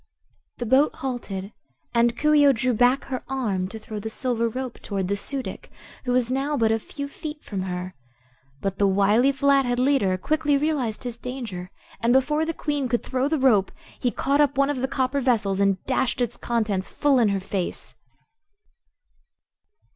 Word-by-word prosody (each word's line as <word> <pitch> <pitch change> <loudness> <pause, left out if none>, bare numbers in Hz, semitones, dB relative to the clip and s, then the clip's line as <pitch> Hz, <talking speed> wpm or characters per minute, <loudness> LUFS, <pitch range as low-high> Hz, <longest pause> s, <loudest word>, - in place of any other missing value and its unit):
The 240 - -3
boat 265 +6 +3
halted 220 -7 -5 0.4
and 235 0 +3
Coo 300 0 +3
ee 290 -1 +6
oh 275 - +6
drew 250 +1 0
back 245 +4 +3
her 255 -2 -5
arm 210 -9 -1
to 220 - -8
throw 215 -1 -7
the 220 +2 -5
silver 235 0 -1
rope 255 +1 -5
toward 195 -3 -3
the 200 - 0
Su 270 +6 -3
dic, - - -8 0.4
who 250 - 0
was 250 -1 +1
now 280 +3 0
but 225 -3 +3
a 225 - +2
few 280 +5 -6
feet 300 +1 -8
from 195 -3 -4
her. 180 0 -4 0.7
But 195 -1 -3
the 200 - +4
wily 205 +7 +4
Flathead 275 -3 +2
leader 250 -8 +2
quickly 300 +6 +1
realized 275 -7 -1
his 240 -2 -5
danger 235 -9 -6 0.3
and 235 +1 +2
before 300 +4 +2
the - - +1
Queen 290 -4 -2
could 240 0 0
throw 260 +1 0
the 315 +1 +1
rope 235 -8 +3 0.3
he 250 - +1
caught 280 +4 +1
up 285 -2 +2
one 275 +1 +3
of 290 - -3
the 260 +1 -1
copper 265 +1 0
vessels 210 -7 +1
and 195 -2 +2
dashed 260 -1 0
its 240 -1 -1
contents 215 -5 -1
full 280 -3 +2
in 225 -3 +4
her 200 -1 0
face! 190 -1 -4
245 Hz, 185 wpm, -24 LUFS, 210-275 Hz, 0.7 s, ee